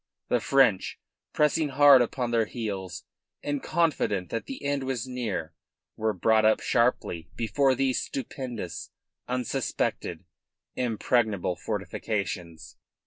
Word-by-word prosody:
The - - +3
French, 135 -8 +3 0.3
pressing 150 0 +2
hard 140 -1 +7
upon 120 0 -1
their 115 -2 +2
heels 100 -7 -5 0.4
and 145 -1 -2
confident 150 - 0
that 115 - -3
the 270 - -7
end 140 -1 0
was 130 -4 -2
near, 115 -11 -3 0.4
were 110 0 0
brought 110 +3 +3
up 110 0 +4
sharply 105 -9 0
before 130 +3 +2
those 130 0 +1
stupendous, 120 -9 -5 0.4
unsuspected, 125 -1 -2 0.5
impregnable 110 -5 +1
fortifications. 85 -7 -4
115 Hz, 110 wpm, -27 LUFS, 100-135 Hz, 0.5 s, hard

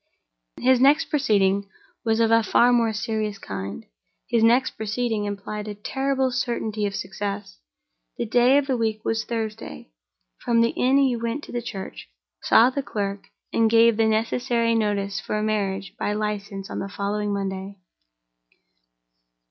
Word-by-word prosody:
His 255 0 +4
next 285 +4 +4
proceeding 200 - +2 0.3
was 225 -1 +1
of 225 -1 +3
a 230 0 +6
far 240 +3 +4
more 230 -2 +3
serious 215 -1 -2
kind; 95 - -6 0.4
his 235 -2 +2
next 240 +3 +4
proceeding 220 0 -2
implied 205 +1 -5
a 210 - -5
terrible 265 +4 -1
certainty 220 -4 -1
of 200 - -5
success. 195 - -5 0.6
The - - -2
day 245 +4 +4
of 285 - +2
the 265 -2 0
week 220 -1 -2
was 225 -1 0
Thursday. 215 - -5 0.5
From 230 -1 +2
the 230 - +3
inn 260 +2 +2
he 270 -3 +3
went 235 +5 -3
to - - -10
the 240 - -2
church, 200 - -8 0.3
saw 240 +3 +5
the 280 - -2
clerk, 200 -5 -4 0.3
and 225 -1 +3
gave 230 0 +5
the 225 -1 +3
necessary 230 +1 +1
notice 200 -3 0
for 215 - -3
a 210 - -1
marriage 195 -3 -2
by 205 - -1
license 205 -2 -4
on - - -4
the 195 - -4
following 205 +1 -2
Monday. 195 0 -4
220 Hz, 155 wpm, -24 LUFS, 200-240 Hz, 0.6 s, a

